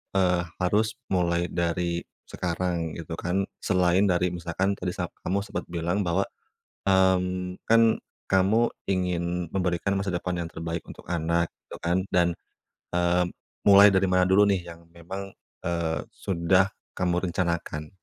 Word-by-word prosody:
eee, 90 Hz, -2 st, +3 dB, 0.2 s
harus 105 Hz, +4 st, +2 dB, 0.2 s
mulai 85 Hz, -1 st, +1 dB
dari 85 Hz, 0 st, 0 dB, 0.2 s
sekarang 85 Hz, -2 st, -2 dB
gitu 80 Hz, 0 st, -6 dB
kan? 95 Hz, +3 st, 0 dB, 0.2 s
Selain 90 Hz, +1 st, +3 dB
dari 90 Hz, -1 st, +2 dB
misalkan 85 Hz, +3 st, -1 dB
tadi 90 Hz, -1 st, -3 dB
sa -, -, -3 dB, 0.2 s
kamu 100 Hz, +2 st, +1 dB
sempet -, -, -5 dB
bilang 85 Hz, +3 st, -1 dB
bahwa, 90 Hz, +3 st, +2 dB, 0.6 s
mmm, 90 Hz, -1 st, +2 dB
kan 115 Hz, 0 st, +4 dB, 0.2 s
kamu 100 Hz, +5 st, +3 dB, 0.2 s
ingin 90 Hz, -1 st, -1 dB
memberikan 90 Hz, 0 st, 0 dB
masa 95 Hz, 0 st, -1 dB
depan 90 Hz, 0 st, -2 dB
yang 85 Hz, -, -5 dB
terbaik 85 Hz, +1 st, -4 dB
untuk -, -, -11 dB
anak 85 Hz, 0 st, +1 dB, 0.2 s
gitu -, -, -10 dB
kan, 85 Hz, +2 st, +1 dB
dan, 85 Hz, -1 st, +3 dB, 0.6 s
eee, 90 Hz, 0 st, +2 dB, 0.4 s
mulai 100 Hz, 0 st, +9 dB
dari 95 Hz, -1 st, +3 dB
mana 90 Hz, 0 st, +3 dB
dulu 100 Hz, +2 st, +6 dB
nih 95 Hz, -4 st, 0 dB
yang 85 Hz, 0 st, -12 dB
memang, 95 Hz, +3 st, -7 dB, 0.3 s
eee, 85 Hz, -3 st, -1 dB
sudah 95 Hz, +1 st, +2 dB, 0.2 s
kamu 90 Hz, 0 st, 0 dB
rencanakan? 85 Hz, -3 st, -2 dB
90 Hz, 140 wpm, -26 LUFS, 85-95 Hz, 0.6 s, mulai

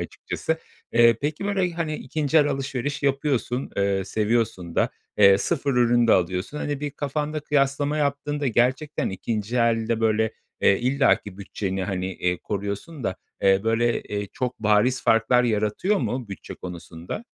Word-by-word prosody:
açıkçası. 160 Hz, 0 st, -3 dB, 0.3 s
Eee, 115 Hz, -1 st, +6 dB
peki, 150 Hz, +6 st, -2 dB
böyle, 195 Hz, -3 st, +1 dB
hani, 165 Hz, -2 st, -2 dB
2'nci 155 Hz, 0 st, -1 dB
el 145 Hz, -, +4 dB
alışveriş 135 Hz, 0 st, -3 dB
yapıyorsun, 135 Hz, -2 st, 0 dB
eee, 100 Hz, -1 st, +1 dB
seviyorsun 105 Hz, -5 st, -1 dB
da, -, -, +2 dB, 0.3 s
eee, 100 Hz, -1 st, +7 dB
sıfır 140 Hz, 0 st, 0 dB
ürünü 120 Hz, -1 st, +4 dB
de 115 Hz, -, +5 dB
alıyorsun. 90 Hz, -, 0 dB
Hani, 145 Hz, -1 st, -3 dB
bir 145 Hz, 0 st, -3 dB
kafanda 150 Hz, +2 st, -3 dB
kıyaslama 145 Hz, 0 st, +1 dB
yaptığında 145 Hz, 0 st, -1 dB
gerçekten 130 Hz, +5 st, +1 dB
2'nci 105 Hz, +4 st, -3 dB
elde 115 Hz, -1 st, +1 dB
böyle, 110 Hz, 0 st, +2 dB, 0.3 s
eee, 100 Hz, -, +4 dB
illaki 125 Hz, -6 st, +1 dB
bütçeni, 95 Hz, -1 st, -3 dB
hani, 95 Hz, -2 st, -2 dB
eee, 90 Hz, 0 st, -1 dB
koruyorsun 100 Hz, -, -5 dB
da, 95 Hz, -, -1 dB, 0.3 s
eee, 95 Hz, 0 st, +5 dB
böyle, 115 Hz, +1 st, +1 dB
eee, 105 Hz, 0 st, -4 dB
çok 125 Hz, -1 st, -3 dB
bariz 110 Hz, +4 st, +2 dB
farklar 125 Hz, +2 st, +4 dB
yaratıyor 110 Hz, -, +1 dB
mu 125 Hz, -, -3 dB
bütçe 100 Hz, -, -8 dB
konusunda? 85 Hz, -, -8 dB
120 Hz, 150 wpm, -24 LUFS, 105-145 Hz, 0.3 s, eee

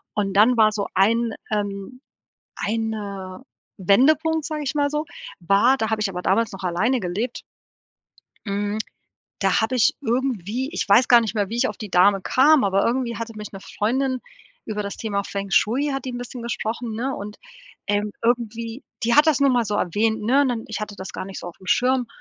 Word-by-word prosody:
Und 200 Hz, -2 st, -1 dB
dann 225 Hz, +5 st, +5 dB
war 215 Hz, -1 st, +5 dB
so 205 Hz, -1 st, -2 dB
ein, 225 Hz, +4 st, +2 dB, 0.2 s
ähm, 205 Hz, +3 st, -3 dB, 0.5 s
ein, 220 Hz, +1 st, -2 dB
äh, 195 Hz, -3 st, -6 dB, 0.4 s
Wendepunkt, 310 Hz, -, +3 dB
sage 305 Hz, -1 st, -3 dB
ich 275 Hz, +1 st, -3 dB
mal 285 Hz, -1 st, +2 dB
so. 300 Hz, +1 st, -2 dB, 0.3 s
War 200 Hz, +9 st, +3 dB
da 220 Hz, -4 st, -1 dB
habe 220 Hz, -1 st, -1 dB
ich 210 Hz, -, +1 dB
aber 180 Hz, -2 st, -5 dB
damals 225 Hz, +3 st, +2 dB
noch 195 Hz, -, -9 dB
alleine 205 Hz, +9 st, +1 dB
gelebt 210 Hz, +6 st, -3 dB, 1.0 s
hm, 205 Hz, +1 st, -2 dB, 0.6 s
da 195 Hz, -2 st, +2 dB
habe 225 Hz, +3 st, 0 dB
ich 240 Hz, -4 st, +3 dB
irgendwie 250 Hz, -, -1 dB
ich -, -, -3 dB
weiß 230 Hz, +5 st, +5 dB
gar 240 Hz, -1 st, +8 dB
nicht 225 Hz, -1 st, -3 dB
mehr 205 Hz, -3 st, 0 dB
wie 230 Hz, -, -4 dB
ich 260 Hz, +2 st, +2 dB
auf -, -, -6 dB
die 210 Hz, -3 st, -8 dB
Dame 195 Hz, +2 st, +4 dB
kam. 275 Hz, +6 st, +4 dB
Aber 195 Hz, 0 st, +2 dB
irgendwie 240 Hz, -1 st, -1 dB
hatte 230 Hz, 0 st, -5 dB
mich 210 Hz, 0 st, -7 dB
'ne 195 Hz, -, -8 dB
Freundin 255 Hz, +6 st, -1 dB, 0.4 s
über 210 Hz, -1 st, -3 dB
das 200 Hz, 0 st, -6 dB
Thema 200 Hz, -3 st, -2 dB
Feng 200 Hz, 0 st, -5 dB
Shui 255 Hz, +10 st, +2 dB
hat 270 Hz, -, -3 dB
die 260 Hz, -, -3 dB
'n 245 Hz, -, -5 dB
bisschen 245 Hz, 0 st, -7 dB
gesprochen, 230 Hz, 0 st, -3 dB
ne? 260 Hz, +4 st, -2 dB
Und, 205 Hz, +1 st, -7 dB, 0.5 s
ähm, 205 Hz, 0 st, 0 dB
irgendwie 230 Hz, +1 st, -1 dB, 0.2 s
die 235 Hz, +1 st, +2 dB
hat 295 Hz, +2 st, +7 dB
das 310 Hz, -3 st, +3 dB
nur 280 Hz, -1 st, +5 dB
mal 245 Hz, -2 st, +2 dB
so 210 Hz, -1 st, -2 dB
erwähnt, 215 Hz, +4 st, 0 dB
ne? 260 Hz, +6 st, +3 dB
Und 245 Hz, -5 st, -1 dB
Ich 220 Hz, -, -4 dB
hatte 210 Hz, -1 st, -5 dB
das 190 Hz, 0 st, -7 dB
gar -, -, -5 dB
nicht 195 Hz, 0 st, -8 dB
so -, -, -7 dB
aufm 180 Hz, +2 st, -14 dB
Schirm. 250 Hz, +4 st, +2 dB
225 Hz, 205 wpm, -23 LUFS, 200-250 Hz, 1.0 s, gar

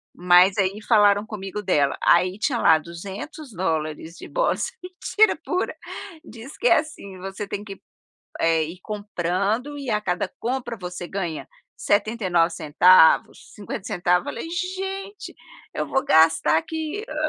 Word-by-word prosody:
mas 180 Hz, +2 st, +5 dB
aí 195 Hz, +2 st, 0 dB
falaram 205 Hz, -2 st, +4 dB
comigo 210 Hz, -1 st, -6 dB
dela. 145 Hz, -8 st, +1 dB
Aí, 180 Hz, +3 st, +3 dB
tinha 250 Hz, -2 st, 0 dB
lá 160 Hz, -, +5 dB
$200 170 Hz, -, -5 dB
de -, -, -10 dB
bolsa, -, -, 0 dB
mentira 365 Hz, +3 st, +1 dB
pura, 365 Hz, +1 st, -2 dB, 0.5 s
diz 240 Hz, -1 st, -11 dB
que 475 Hz, -, +1 dB
é -, -, +6 dB
assim: 300 Hz, -12 st, -8 dB
você 195 Hz, +2 st, -6 dB
tem 200 Hz, -, -5 dB
que, 195 Hz, -2 st, -8 dB, 0.6 s
eh, 165 Hz, -1 st, +3 dB
ir 170 Hz, +4 st, -9 dB
comprando 205 Hz, +6 st, -2 dB
e 275 Hz, -3 st, -6 dB
a 210 Hz, -1 st, 0 dB
cada 180 Hz, -3 st, -2 dB
compra 240 Hz, -1 st, -3 dB
você 180 Hz, -1 st, -7 dB
ganha 175 Hz, -5 st, -4 dB, 0.3 s
79 200 Hz, -5 st, +1 dB
centavos, 160 Hz, +3 st, +4 dB
50 200 Hz, -2 st, -6 dB
centavos, 180 Hz, 0 st, +1 dB
falei: -, -, -5 dB
"Gente, 385 Hz, +3 st, -5 dB, 0.4 s
eu -, -, -3 dB
vou 270 Hz, -, 0 dB
gastar 160 Hz, 0 st, +4 dB
aqui, 320 Hz, -, -4 dB
hã" 310 Hz, -, -7 dB
200 Hz, 140 wpm, -23 LUFS, 175-265 Hz, 0.6 s, é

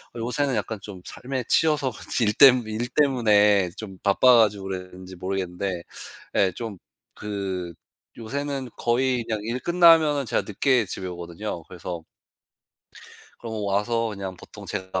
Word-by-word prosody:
요새는 125 Hz, +3 st, -1 dB
약간 110 Hz, 0 st, -3 dB
좀 100 Hz, -3 st, -9 dB
삶에 130 Hz, 0 st, -4 dB
치여서 150 Hz, -5 st, +3 dB, 0.3 s
일 105 Hz, -2 st, +3 dB
때문 125 Hz, -3 st, +6 dB
일 110 Hz, +3 st, -3 dB
때문에 105 Hz, -9 st, +3 dB
좀 95 Hz, -4 st, -8 dB
바빠 120 Hz, +5 st, +5 dB
가지고 105 Hz, -3 st, +2 dB
그랬는지 95 Hz, 0 st, -7 dB
모르겠는데 90 Hz, -1 st, -3 dB, 0.5 s
예 95 Hz, -2 st, +3 dB
좀 110 Hz, -5 st, -6 dB, 0.4 s
그 95 Hz, -4 st, -4 dB, 0.5 s
요새는 135 Hz, +2 st, -4 dB
거의 125 Hz, 0 st, +1 dB
그냥 110 Hz, -1 st, -2 dB
일 120 Hz, +4 st, -3 dB
끝나면은 165 Hz, -4 st, +5 dB
제가 110 Hz, -, 0 dB
늦게 120 Hz, +3 st, +2 dB
집에 95 Hz, -, -5 dB
오거든요. 85 Hz, +1 st, -6 dB
그래서 85 Hz, -1 st, -7 dB, 1.4 s
그럼 110 Hz, -3 st, -5 dB
와서 115 Hz, +4 st, 0 dB
그냥 95 Hz, -3 st, -6 dB
보통 -, -, -12 dB
제가 95 Hz, 0 st, -3 dB
110 Hz, 285 characters per minute, -24 LUFS, 95-125 Hz, 1.4 s, 때문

